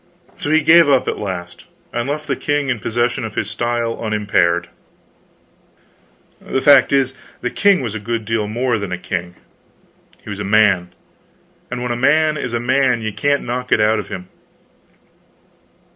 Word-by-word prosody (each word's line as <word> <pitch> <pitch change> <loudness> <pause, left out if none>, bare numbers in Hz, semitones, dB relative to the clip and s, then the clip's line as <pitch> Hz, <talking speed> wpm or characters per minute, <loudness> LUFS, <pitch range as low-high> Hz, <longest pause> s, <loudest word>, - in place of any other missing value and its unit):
So - - -3
he 155 +1 +4
gave 165 0 +6
up 135 -2 +3
at - - -2
last, 90 -4 -6 0.3
and 120 +3 -2
left 150 +1 -3
the 140 - -1
king 145 0 -1
in 125 -4 -1
possession 120 +3 -1
of 110 -1 -6
his - - -2
style 120 0 -2
unimpaired. 100 -5 +1 1.8
The - - -1
fact 140 -1 +6
is, 135 -2 +2 0.3
the 125 - -2
king 200 -4 +3
was 115 -5 -4
a 110 - -4
good 115 +1 -3
deal 110 -1 -1
more 120 +1 -1
than 100 -2 -5
a 90 - -2
king, 90 -1 -5 0.9
he - - -10
was 100 - -6
a - - -3
man; 100 -3 +3 0.8
and 125 0 -4
when 125 - -2
a - - -1
man 150 +5 +3
is 125 -5 -4
a 120 - 0
man, 125 -1 +1
you 110 -1 -3
can't 145 +4 0
knock 125 +1 -4
it - - +4
out 110 +1 +3
of 100 - -6
him. 95 -3 -7
120 Hz, 175 wpm, -18 LUFS, 105-135 Hz, 1.8 s, gave